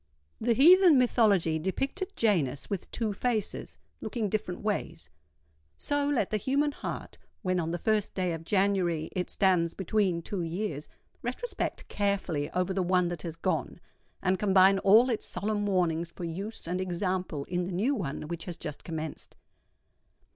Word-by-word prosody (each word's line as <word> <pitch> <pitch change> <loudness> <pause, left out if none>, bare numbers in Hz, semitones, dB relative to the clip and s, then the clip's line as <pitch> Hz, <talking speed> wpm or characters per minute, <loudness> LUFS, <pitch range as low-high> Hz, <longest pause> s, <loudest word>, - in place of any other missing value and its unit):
The 235 +1 +2
heathen 345 - +7
mythology 205 -10 +3
depicted 275 - -3
Janus 145 - +1
with 195 -3 -3
two 220 -3 -2
faces, 220 -1 -2 0.2
looking 220 -1 -2
different 185 -3 -3
ways:—so 75 - -4
let 240 -10 0
the 215 - +2
human 280 +7 +1
heart, - - -6 0.2
when 185 -2 +1
on 165 -1 -1
the 175 - -1
first 215 +3 0
day 180 -2 0
of 165 0 -6
January, 185 -4 +1
it 180 -1 -2
stands 180 -4 +2
between 190 -2 0
two 195 0 -3
years, 165 -2 -3 0.3
retrospect 255 - -4
carefully 195 -8 -1
over 180 +1 -1
the 190 - 0
one 180 -1 +2
that 175 -3 -5
has 165 -1 -5
gone, 165 - -2 0.4
and 185 0 +2
combine 195 -1 +5
all 215 +6 +6
its 225 - -3
solemn 205 +2 -2
warnings 170 -3 +1
for 170 - -9
use 195 +7 -5
and 180 +2 -1
example 180 -4 -2
in 175 +3 -2
the 185 - -5
new 210 +11 +1
one 165 - -3
which 170 0 -5
has 175 -3 -6
just 150 -2 -7
commenced. 160 -2 -6
185 Hz, 155 wpm, -29 LUFS, 165-215 Hz, 0.4 s, heathen